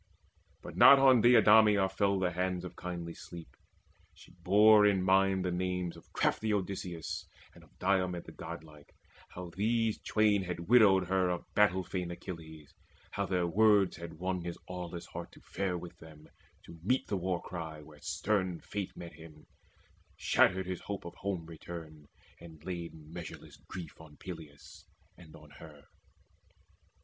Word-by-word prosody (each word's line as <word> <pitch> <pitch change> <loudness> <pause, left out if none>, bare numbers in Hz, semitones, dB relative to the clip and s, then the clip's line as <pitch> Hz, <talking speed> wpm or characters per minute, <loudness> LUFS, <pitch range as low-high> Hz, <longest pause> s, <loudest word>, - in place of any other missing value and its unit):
But - - -9
not 140 - +9
on 130 -3 +6
Deidameia 105 -4 +6
fell 100 +1 +1
the 90 -1 0
hands 90 0 -2
Of 90 - -8
kindly 85 -2 -6
sleep. 85 -1 -11 0.6
She - - -17
bore 105 +4 +5
in 100 -3 +3
mind 95 0 +3
the 90 - 0
names 90 -1 -2
Of - - -17
crafty 110 0 0
Odysseus 95 -4 -3 0.3
and - - -17
of - - -24
Diomede 90 -2 0
The - - -11
godlike, 80 -3 -10 0.3
how 90 -1 -8
these 110 +4 0
twain 105 -2 +2
had 90 -1 -4
widowed 100 -5 +6
her 95 -1 +2
Of 90 -1 -3
battle 95 -3 +3
fain 90 -1 -4
Achilles, 80 -4 -9 0.4
how - - -2
their 90 -2 0
words 100 +1 +3
Had 85 0 -8
won 90 +1 -2
his 85 0 -5
aweless 90 -1 -6
heart - - -8
to - - -15
fare 95 -2 -3
with 85 -1 -10
them 80 -1 -14 0.4
To 85 - -13
meet 125 +9 +1
the 100 - -2
war 90 -1 -1
cry 80 -3 -7
where 75 -1 -16
stern 90 +2 -1
Fate 100 -3 -6
met 85 -1 -8
him, 80 -2 -14 0.7
Shattered 95 0 +3
his 90 -1 -5
hope 100 -3 -6
of 85 - -7
home 95 -2 -4
return, 80 -2 -10 0.3
and 80 -2 -13
laid 85 -3 -5
Measureless 80 +2 -10
grief 85 -3 -8
on 75 -2 -15
Peleus 80 -6 -11 0.3
and 80 -3 -15
on 75 -1 -15
her. 75 -3 -13
90 Hz, 160 wpm, -32 LUFS, 85-95 Hz, 0.7 s, not